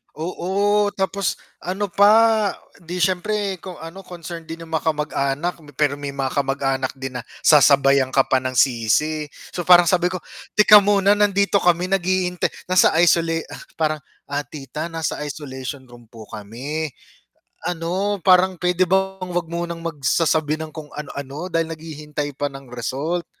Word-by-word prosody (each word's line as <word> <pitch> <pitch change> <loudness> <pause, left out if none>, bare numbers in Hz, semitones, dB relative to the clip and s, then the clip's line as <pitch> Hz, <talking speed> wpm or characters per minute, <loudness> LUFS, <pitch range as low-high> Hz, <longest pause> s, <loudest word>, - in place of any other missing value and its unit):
Oo, 200 +5 0
tapos 195 0 -1 0.3
ano 195 +2 -3
pa, 215 +2 +5 0.3
di 175 +1 -5
siyempre 195 +2 0
kung 185 +1 -8
ano, 165 +4 -9
concerned 170 -1 -8
din 165 +1 -7
yung 160 - -14
makamag-anak 150 0 -1 0.2
pero 145 -2 +1
may 140 -1 -5
mga 135 -1 -2
kamag-anak 135 -1 0
din 130 -1 -6
na - - -8 0.2
sasabayan 140 -3 +5
ka 135 - +6
pa 130 - +4
ng 130 0 -4
sisi. 135 +5 +2 0.3
So 175 - -4
parang 175 -2 +7
sabi 180 0 +3
ko, 185 - -4 0.3
teka 210 0 +8
muna 200 0 +3
nandito 200 -1 +3
kami 175 0 +2
naghihintay, 185 -1 +1 0.2
nasa 185 - +5
isola 165 -1 +3 0.2
ah, - - -9
parang, 155 -1 0 0.3
ah, 145 0 -2
"Tita 150 +2 -6
nasa 160 -2 -2
isolation 135 -2 -6
room 120 -1 -15
po 115 -1 -12
kami, 130 +10 -5 0.8
ano 180 +4 -2
parang 185 0 +5
pwede 180 +1 +2
bang 190 0 0
wag 175 -2 -1
munang 170 0 -4
magsasabi 155 0 +1
ng 155 - -9
kung 155 -1 -9
ano 150 -1 -6
ano 140 +6 -6
dahil 165 -1 0
naghihintay 150 -2 -6
pa 145 - -1
ng 135 -2 -11
result." 140 +8 -3
165 Hz, 150 wpm, -21 LUFS, 140-185 Hz, 0.8 s, teka